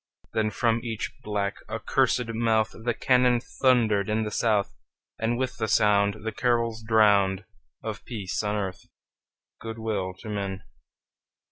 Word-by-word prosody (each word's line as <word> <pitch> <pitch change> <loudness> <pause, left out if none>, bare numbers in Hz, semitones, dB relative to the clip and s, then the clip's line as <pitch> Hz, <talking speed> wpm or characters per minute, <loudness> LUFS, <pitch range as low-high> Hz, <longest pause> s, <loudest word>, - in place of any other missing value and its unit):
Then 110 -1 +1
from 115 +2 +1
each 115 -3 -4
black, 105 -1 -2
accursed 120 +3 +1
mouth 110 -1 +2
The 115 +1 -3
cannon 125 -1 +3
thundered 115 -5 +2
in 110 +1 +1
the 105 - -4
South, 105 -3 +1 0.5
And 115 +1 0
with 130 0 -2
the 110 - -1
sound 100 0 +3
The 110 - -1
carols 115 0 0
drowned 105 -3 +3 0.4
Of - - -5
peace 100 -6 -3
on 105 0 -1
earth, 95 -3 -4 0.7
good 115 0 -6
will 100 -5 -2
to 110 - -9
men! 100 -2 -3
110 Hz, 140 wpm, -26 LUFS, 100-115 Hz, 0.7 s, cannon